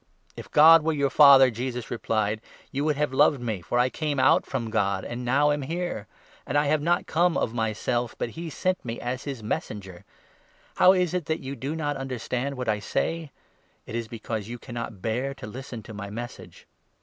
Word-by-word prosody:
" - - -43
If - - -9
God 160 +2 +8
were 160 +1 0
your 140 -2 0
Father," 135 -2 +8
Jesus 125 +1 -5
replied, 110 -2 -1 0.3
"you 140 +1 -2
would 150 -1 +1
have 150 +1 0
42 130 - -6
loved 145 -1 +5
me, 110 -6 -3
for 120 - -2
I 125 +1 +3
came 150 -3 -2
out - - +4
from 115 -4 -3
God, 100 -3 0
and 120 +1 -5
now 140 +4 +3
am 145 0 -1
here; 165 - -4 0.4
and - - -1
I 145 - +3
have 150 +1 +2
not 175 +3 +1
come 175 +1 +2
of 110 - -1
myself, 120 +1 -1
but - - -2
he 165 +4 -6
sent 185 +4 -1
me 115 -1 -5
as 125 +2 -4
his 135 -6 -5
Messenger. 95 -4 -5 0.7
How 185 - +7
is 180 -3 +1
it 180 -4 -1
that 160 +2 -2
you 135 +1 -5
do 140 +6 -4
not 145 -2 -2
understand 130 +1 -3
what 125 - -4
I 105 -1 +1
say? 165 +9 -2 0.6
It - - -9
is 115 -1 -3
because 110 -2 -5
43 115 - -9
you 120 - -5
cannot 115 -5 -7
bear 125 +5 -1
to - - -9
listen 120 0 -8
to 110 - -10
my 100 -1 -6
Message. 120 +4 -8
130 Hz, 215 wpm, -26 LUFS, 115-150 Hz, 0.7 s, God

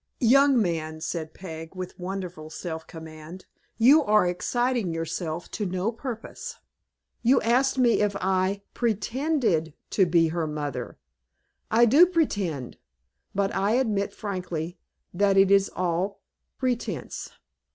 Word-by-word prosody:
"Young 275 +2 +6
man," 160 -5 -1
said 160 -1 -4
Peg, 165 -1 -8
with 185 0 -7
wonderful 180 -4 -5
self 160 0 -6
command, 160 +2 -10 0.3
"you 265 +7 +7
are 210 -4 +4
exciting 235 +3 0
yourself 165 0 -4
to 215 - -3
no 185 +4 -1
purpose. 255 - -7 0.6
You 250 +3 +4
asked 260 +4 +2
me 245 -4 +4
if 205 -1 +1
I 190 +1 0
pretended 230 - 0 0.2
to 190 -3 +3
be 165 -1 +3
her 165 -1 -1
mother. 150 -3 -4 0.7
I 235 +2 +5
do 290 +10 +7
pretend; 200 - -1 0.6
but 195 0 +1
I 200 +3 +1
admit, 215 -6 +1
frankly, 180 -4 -5 0.3
that 195 +1 +3
it 195 0 +5
is 195 0 +5
all 185 +2 -2 0.3
pretence." 250 -3 -3
195 Hz, 125 wpm, -26 LUFS, 165-235 Hz, 0.7 s, you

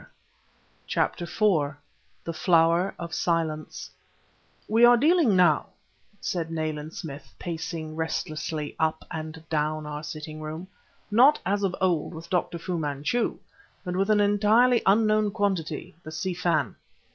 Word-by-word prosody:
Yet... - - -17 0.8
CHAPTER 175 - 0
IV 165 -8 +1 0.5
THE 165 - -4
FLOWER 170 +2 +3
OF 170 -1 -6
SILENCE 160 -3 -2 0.8
"We 225 +2 +3
are 240 0 +8
dealing 300 - +4
now," 175 -5 +4 0.5
said 165 -3 -2
Nayland 155 -1 -4
Smith, 140 -3 -8
pacing 160 -2 -5
restlessly 155 -1 -3
up 160 0 0
and 160 0 -7
down 155 0 -1
our 150 0 -5
sitting 155 0 -7
room, 155 +4 -6 0.4
"not, 255 +8 +6
as 200 +2 +1
of 195 -2 0
old, 175 -3 0
with 165 +4 -10
Dr. 175 -1 0
Fu 170 +1 -3
Manchu, 150 - -1 0.5
but 180 0 -3
with 195 +2 +1
an 210 -1 +4
entirely 215 +4 +4
unknown 215 +1 +4
quantity 195 -7 -2
the 155 - -9
Si 180 +4 -2
Fan." 165 - 0
165 Hz, 135 wpm, -26 LUFS, 155-200 Hz, 0.8 s, are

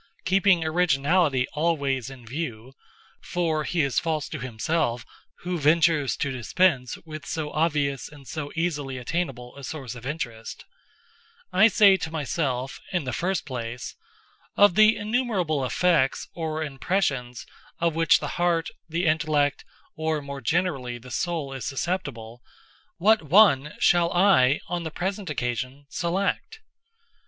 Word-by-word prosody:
Keeping 190 -2 +3
originality 155 -3 +2
always 140 -5 0
in 130 -3 -12
view—for 155 - -5
he 170 0 +1
is 140 -3 +1
false 155 -3 -2
to 155 - -5
himself 125 +1 -1 0.4
who 180 -1 -3
ventures 155 -1 +3
to 140 - -1
dispense 130 +1 +1
with 155 -2 -8
so 155 -2 -4
obvious 145 -4 0
and 145 -3 -14
so 150 -3 -5
easily 150 -6 -2
attainable 125 -2 -4
a 140 - -11
source 135 -4 -6
of 125 0 -9
interest—I 150 - -3
say 200 -3 +6
to 160 - -4
myself, 140 -4 -2
in 180 -4 0
the 130 -2 -4
first 185 +9 -1
place, 120 -3 -6 0.6
"Of 205 -3 +6
the 215 +3 +6
innumerable 205 - 0
effects, 150 0 +1
or 160 -1 -3
impressions, 135 - -2 0.3
of 170 -1 +1
which 165 0 +4
the - - -4
heart, 170 -2 +1 0.2
the 170 +3 -1
intellect, 155 -2 +1 0.3
or 160 0 -1
(more 140 -1 -7
generally) 135 -4 -1
the 125 +1 -13
soul 160 -6 -2
is 135 -3 -6
susceptible, 130 -6 -4 0.6
what 215 +4 +4
one 150 -4 +4
shall 175 -1 +3
I, 175 -8 +4
on 175 0 -2
the 165 - -4
present 190 +4 -4
occasion, 130 +1 -3
select?" 195 - -2
155 Hz, 130 wpm, -25 LUFS, 135-175 Hz, 0.6 s, say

